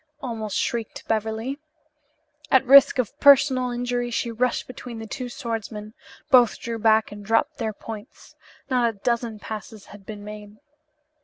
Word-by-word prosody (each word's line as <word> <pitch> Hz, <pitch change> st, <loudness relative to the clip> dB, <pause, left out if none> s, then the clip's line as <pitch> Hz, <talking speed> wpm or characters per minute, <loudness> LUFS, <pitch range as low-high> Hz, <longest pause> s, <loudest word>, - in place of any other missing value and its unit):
almost 220 Hz, -6 st, -4 dB
shrieked 230 Hz, -2 st, -3 dB
Beverly. 225 Hz, +5 st, -2 dB, 0.9 s
At 265 Hz, 0 st, +4 dB
risk 275 Hz, +2 st, +7 dB
of 250 Hz, -5 st, -2 dB
personal 270 Hz, -3 st, +5 dB
injury 245 Hz, 0 st, -2 dB
she 235 Hz, 0 st, -2 dB
rushed 245 Hz, +2 st, 0 dB
between 250 Hz, -2 st, -9 dB
the 225 Hz, -, -7 dB
two 245 Hz, +3 st, -6 dB
swordsmen. 225 Hz, -5 st, -5 dB, 0.4 s
Both 245 Hz, -3 st, +6 dB
drew 230 Hz, -1 st, -5 dB
back 220 Hz, 0 st, +3 dB
and 205 Hz, 0 st, -9 dB
dropped 225 Hz, +9 st, 0 dB
their 225 Hz, -2 st, -1 dB
points. 215 Hz, +3 st, -11 dB, 0.3 s
Not 250 Hz, -3 st, +2 dB
a 220 Hz, -, -8 dB
dozen 235 Hz, +1 st, -1 dB
passes 215 Hz, 0 st, -8 dB
had 205 Hz, -1 st, -13 dB
been 205 Hz, +1 st, -9 dB
made. 210 Hz, 0 st, -10 dB
230 Hz, 150 wpm, -24 LUFS, 215-250 Hz, 0.9 s, risk